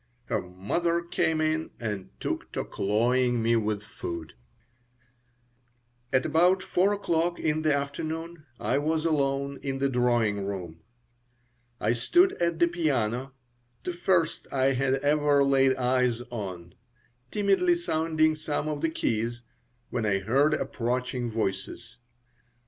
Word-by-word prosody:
Her - - -1
mother 165 - -1
came 160 -2 0
in 155 0 0
and 105 -5 -4
took - - -3
to - - -2
cloying 120 +4 +1
me 115 +1 +2
with 105 -2 -1
food 85 -7 -7 1.8
At 130 -1 +2
about 180 +4 +3
4 190 +3 +2
o'clock 170 -3 0
in 155 0 0
the 155 -1 +2
afternoon 155 +3 -4
I 135 - +1
was 155 +2 0
alone 140 -3 0
in 135 -1 -3
the 140 0 +1
drawing 120 -5 +1
room. 90 -5 -5 1.0
I 110 +3 +2
stood 350 - +3
at 170 -1 +1
the 170 - +4
piano 135 -7 -1 0.5
the 180 - -3
first 175 -2 +1
I 135 0 +2
had 130 +1 +1
ever 145 -1 +3
laid 135 -1 +4
eyes 125 -2 +1
on 90 -7 -6 0.6
timidly 210 - +3
sounding 160 - +1
some 155 -1 -3
of 150 -1 -3
the 165 - +1
keys, 120 -5 -2 0.5
when 115 -3 -1
I 95 -1 +2
heard 135 +10 +2
approaching 125 0 -2
voices. 110 +1 -4
135 Hz, 130 wpm, -27 LUFS, 115-160 Hz, 1.8 s, the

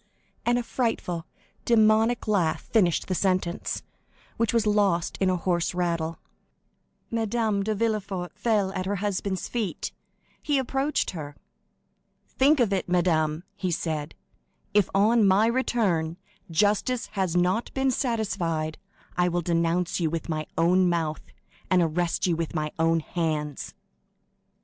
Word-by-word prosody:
and 240 0 +4
a 245 - -1
frightful, 185 -9 -2 0.4
demoniac 220 +1 +3
laugh 185 -7 +1
finished 180 -7 +2
the 185 - -1
sentence, 185 -1 -1 0.5
which 230 -2 +1
was 230 -2 +2
lost 200 -5 +2
in 190 - +3
a 185 - +1
hoarse 175 0 0
rattle. 170 -2 -1 0.9
Madame 225 -2 0
de 215 +2 -1
Villefort 205 -5 -2
fell 210 -3 +1
at 185 -1 -3
her 205 - 0
husband's 200 -1 -2
feet. 225 -6 -3 0.5
He 290 -2 +1
approached 270 +3 0
her. 150 -4 -7 0.9
"Think 285 +3 +3
of 225 -5 +3
it, 190 -2 -1
madame," 165 -3 +1
he 185 - -2
said; 155 -2 -3 0.6
"if, 205 -3 +3
on 215 +2 +4
my 195 +3 +5
return, 210 -9 +1 0.3
justice 210 +8 +1
has 190 -4 -1
not 180 +6 +1
been 265 0 +2
satisfied, 185 - -1 0.4
I 180 0 +3
will 175 0 0
denounce 170 +1 0
you 165 -2 +1
with 165 +1 -4
my 155 -1 -2
own 180 +2 +4
mouth, 160 -3 -1 0.5
and 185 - +4
arrest 170 +1 0
you 175 -3 +2
with 165 0 -3
my 155 -1 -1
own 165 0 +3
hands!" 155 -4 -3
185 Hz, 135 wpm, -26 LUFS, 165-215 Hz, 0.9 s, my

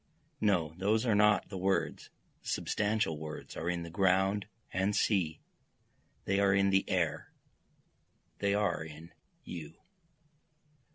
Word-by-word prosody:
No, 90 -7 +2
those 110 +5 +2
are 115 - +3
not 105 -2 +4
the 95 - -5
words, 95 +1 0 0.3
the - - -14
substantial 105 -7 0
words 80 0 -7
are 85 - -2
in 90 -1 -1
the 85 - -8
ground 95 +2 +2 0.3
and 95 +3 +1
sea, 90 -7 +1 0.8
They 100 +1 +1
are 100 -1 +4
in 100 0 +3
the 95 0 +2
air, - - 0 1.1
they 100 0 +2
are 100 -6 0
in 80 +1 -11 0.3
you. 80 -2 -8
95 Hz, 130 wpm, -32 LUFS, 85-105 Hz, 1.1 s, not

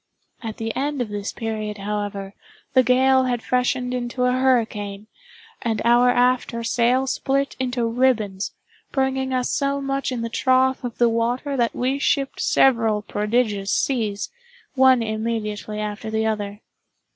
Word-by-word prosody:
At 225 -2 -6
the 225 0 -4
end 285 +1 -1
of 245 -3 -2
this 205 -1 -4
period, 215 -2 -4
however, 205 -1 -4 0.4
the 260 - +6
gale 260 +1 +4
had 245 -2 -1
freshened 250 0 0
into 250 0 -2
a 250 - +3
hurricane, 225 -6 0 0.6
and 225 -2 -1
our 240 +1 +5
after 245 -1 +1
sail 245 +3 +2
split 275 +1 -1
into 250 -2 -1
ribbons, 230 -5 +1 0.4
bringing 265 -1 0
us 255 -1 0
so 280 -1 0
much 275 0 -2
in 245 -2 -3
the - - -1
trough 260 +2 +2
of 245 -2 -5
the 240 - +4
water 240 +5 0
that 240 -3 0
we 260 +3 0
shipped 275 -1 0
several 225 -5 +3
prodigious 210 -2 0
seas, 220 -7 -1 0.4
one 260 -3 +5
immediately 215 -1 -3
after 210 +1 -4
the 220 0 0
other. 205 -1 -3
240 Hz, 145 wpm, -22 LUFS, 215-260 Hz, 0.6 s, the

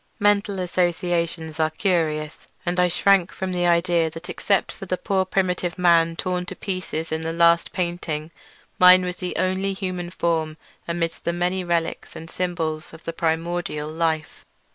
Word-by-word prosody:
Mental 205 -2 +2
associations 175 -3 -1
are 155 0 +3
curious, 160 -3 -1 0.2
and 180 +1 0
I 180 - +5
shrank 185 +1 +3
from 190 -1 -4
the 175 -1 +1
idea 170 -1 +3
that 165 +3 -8
except 200 -1 0
for 195 - -10
the 185 - 0
poor 190 -1 0
primitive 180 -2 -1
man 170 -2 +4
torn 180 0 -2
to - - -5
pieces 185 -5 -4
in 160 0 -1
the 160 0 -2
last 170 0 +4
painting, 170 -3 -3 0.5
mine 180 0 +8
was 180 0 -4
the 180 - -4
only 190 +1 0
human 185 -2 -4
form 160 -3 -1 0.3
amidst 170 -1 -2
the 170 - 0
many 180 +2 0
relics 170 -1 -2
and 165 +1 -9
symbols 165 -3 -3
of 160 - -13
primordial 165 -2 -1
life. 160 -1 -2
175 Hz, 160 wpm, -23 LUFS, 165-185 Hz, 0.5 s, mine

